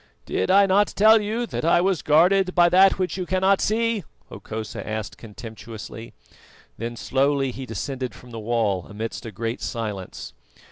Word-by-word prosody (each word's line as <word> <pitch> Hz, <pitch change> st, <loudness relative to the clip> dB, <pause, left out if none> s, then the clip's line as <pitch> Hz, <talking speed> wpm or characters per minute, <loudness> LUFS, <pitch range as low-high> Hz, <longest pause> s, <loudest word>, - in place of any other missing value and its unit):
"Did 95 Hz, -, -1 dB
I 200 Hz, +1 st, +6 dB
not 195 Hz, +2 st, +3 dB
tell 220 Hz, +2 st, +5 dB
you 220 Hz, +4 st, -2 dB
that -, -, -5 dB
I 165 Hz, +1 st, +4 dB
was 185 Hz, -1 st, +1 dB
guarded 185 Hz, +5 st, +3 dB
by 175 Hz, -1 st, +6 dB
That 190 Hz, +2 st, +5 dB
which 185 Hz, 0 st, -2 dB
you 180 Hz, -2 st, -4 dB
cannot 190 Hz, +1 st, +2 dB
see?" 230 Hz, -1 st, 0 dB, 0.3 s
Hokosa 110 Hz, 0 st, -6 dB
asked 110 Hz, -2 st, -4 dB
contemptuously. 115 Hz, 0 st, -10 dB, 0.6 s
Then 115 Hz, +1 st, -5 dB
slowly 135 Hz, +2 st, +1 dB
he 130 Hz, +1 st, -8 dB
descended 125 Hz, +4 st, -4 dB
from 125 Hz, -, -14 dB
the 115 Hz, -, -6 dB
wall 110 Hz, -5 st, -1 dB
amidst 110 Hz, +2 st, -6 dB
a -, -, -6 dB
great 115 Hz, +4 st, -4 dB
silence. 105 Hz, -6 st, -5 dB
135 Hz, 160 wpm, -23 LUFS, 115-190 Hz, 0.6 s, I